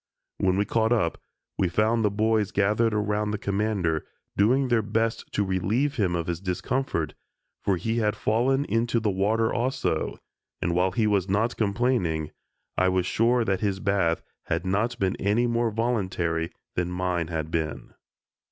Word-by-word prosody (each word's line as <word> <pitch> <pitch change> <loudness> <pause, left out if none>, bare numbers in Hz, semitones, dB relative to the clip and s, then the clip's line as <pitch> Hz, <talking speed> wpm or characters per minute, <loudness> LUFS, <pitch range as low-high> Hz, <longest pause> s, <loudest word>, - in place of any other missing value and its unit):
When 95 0 +2
we 100 - +2
caught 110 +1 +1
up, 100 -9 +1 0.4
we 90 - +2
found 110 +5 +2
the 105 - +3
boys 105 0 +1
gathered 105 +3 +2
around 105 0 0
the 105 - -1
Commander, 100 -6 -1 0.3
doing 130 +7 +3
their 120 -2 +3
best 110 +2 -1
to 105 - +2
relieve 110 +10 0
him 95 -5 +1
of 85 -1 -1
his 85 0 -3
discomfort, 100 +8 -1 0.5
for 95 -2 +2
he 115 +6 -1
had 105 -1 +1
fallen 130 +7 +1
into 115 0 +1
the 110 -2 0
water, 110 +4 +1
also, 125 +2 -1 0.4
and 85 - 0
while 90 +2 +3
he 110 +2 +2
was 100 -3 +1
not 110 +5 +1
complaining, 100 - 0 0.5
I 95 0 +4
was 90 -1 +1
sure 115 +4 +2
that 95 -3 +1
his 100 -3 0
bath 95 -4 +1 0.2
had 85 +3 -1
not 110 +6 0
been 95 -1 0
any 105 +5 +2
more 120 -1 +1
voluntary 95 -8 -1 0.2
than 90 0 -1
mine 90 -2 -1
had 80 -1 -3
been. 80 -2 -3
105 Hz, 165 wpm, -26 LUFS, 90-115 Hz, 0.5 s, I